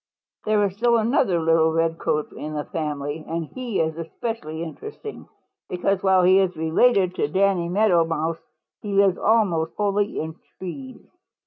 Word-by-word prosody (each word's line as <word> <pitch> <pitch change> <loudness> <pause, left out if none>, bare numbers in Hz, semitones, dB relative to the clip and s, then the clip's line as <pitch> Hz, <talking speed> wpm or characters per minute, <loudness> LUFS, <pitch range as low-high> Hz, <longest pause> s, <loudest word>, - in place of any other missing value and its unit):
"There 215 -1 +3
is 195 -1 -3
still 235 +1 +3
another 220 -5 +2
little 160 0 +3
Redcoat 165 -2 0
in 155 0 -6
the 150 - -2
family, 150 -1 -4
and 165 0 -3
he 245 - -4
is 160 0 -1
especially 165 -2 -5
interesting 430 - -8 0.4
because 190 +2 0
while 190 -1 +4
he 185 +2 +6
is 185 -3 0
related 185 +4 +3
to - - +1
Danny 185 +1 +1
Meadow 185 -3 +3
Mouse 165 0 -2 0.4
he 205 -2 -4
lives 195 -2 +3
almost 190 -8 +2
wholly 205 0 0
in 160 +1 -5 0.2
trees. 255 +8 -8
180 Hz, 150 wpm, -23 LUFS, 160-205 Hz, 0.4 s, he